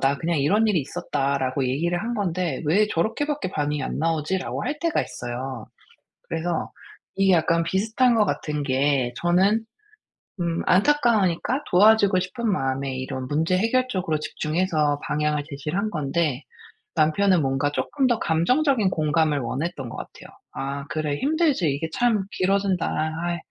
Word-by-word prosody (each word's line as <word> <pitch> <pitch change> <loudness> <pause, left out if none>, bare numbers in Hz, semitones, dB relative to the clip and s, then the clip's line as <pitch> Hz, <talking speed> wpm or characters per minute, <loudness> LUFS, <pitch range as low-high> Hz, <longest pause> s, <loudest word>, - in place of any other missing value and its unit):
'나 135 +1 +2
그냥 165 +1 -1
이런 205 +11 +3
일이 190 -7 +2
있었다.'라고 140 -4 -1
얘기를 170 +7 0
한 240 +1 -2
건데 180 -5 -2
왜 200 +8 +3
저렇게밖에 230 - -1
반응이 150 -3 -1
안 - - -3
나오지?'라고 165 +3 -1
할 300 - -3
때가 335 -2 +1
있어요. 120 0 -6 0.6
그래서 165 +1 -2 0.5
이게 195 -1 +4
약간 165 0 +2
비슷한 225 +7 +2
것 215 -2 +4
같은 150 -6 -2
게 135 -2 +1
저는 195 +6 +2 0.8
음 170 -1 -1
안타까우니까 230 - +2
도와주고 200 0 +5
싶은 205 +5 -2
마음에 135 -4 -1
이런 130 0 -5
문제 160 +5 +1
해결 250 +6 +2
쪽으로 185 -8 -1
집중해서 155 -2 0
방향을 150 -1 0
제시를 150 +4 -4
한 215 +1 -1
건데 150 -2 -1 0.5
남편은 165 +3 +3
뭔가 135 +2 0
쪼끔 270 - 0
더 240 -2 +2
감정적인 225 - +2
공감을 155 -1 +1
원했던 135 +1 -4
것 - - -8
같아요. - - -10 0.2
"아. 140 +1 -4
그래 155 -2 -2
힘들지. 295 - +1
이게 140 +4 -2
참 225 -5 +2
길어진다. 190 -2 +1 0.4
아이. 175 0 -1
170 Hz, 330 characters per minute, -24 LUFS, 145-200 Hz, 0.8 s, 도와주고